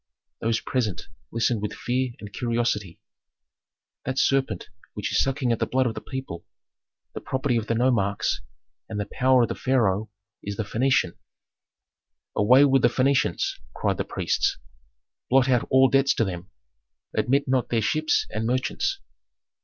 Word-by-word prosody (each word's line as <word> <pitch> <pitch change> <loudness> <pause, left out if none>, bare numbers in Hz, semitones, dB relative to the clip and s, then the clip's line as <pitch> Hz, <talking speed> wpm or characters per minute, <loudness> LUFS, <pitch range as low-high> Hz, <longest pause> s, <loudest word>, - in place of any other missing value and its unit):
Those 115 0 0
present 115 -8 -2 0.2
listened 115 -1 0
with 105 0 -3
fear 125 +3 -1
and 105 -1 -10
curiosity. 115 -6 -1 1.0
"That 130 0 -3
serpent 135 -10 +1 0.3
which - - -3
is - - +3
sucking 135 -2 0
at 115 - 0
the - - 0
blood 130 0 +1
of 115 - 0
the - - -7
people, 130 -11 -6 0.7
the - - -6
property 130 -1 -1
of 115 -1 -1
the 115 - 0
nomarchs, 115 -5 +1 0.5
and 105 -2 -4
the 105 - -1
power 130 +3 +3
of - - 0
the - - -1
pharaoh 110 -5 +1 0.3
is 100 0 -5
the 110 - -2
Phœnician!" 115 -3 +1 1.2
"Away 125 +7 +6
with 135 -2 +4
the 120 - +6
Phœnicians!" 130 +2 +1 0.2
cried - - 0
the - - -1
priests. - - 0 0.7
"Blot 130 0 +4
out 125 -3 +2
all 130 0 +6
debts 135 +1 +3
to 115 - +2
them. 90 -2 -6 0.7
Admit 140 +3 +1
not 130 -1 +1
their 115 - +1
ships 155 +8 +1
and 110 +1 -2
merchants." 130 - -1
120 Hz, 155 wpm, -25 LUFS, 110-130 Hz, 1.2 s, Away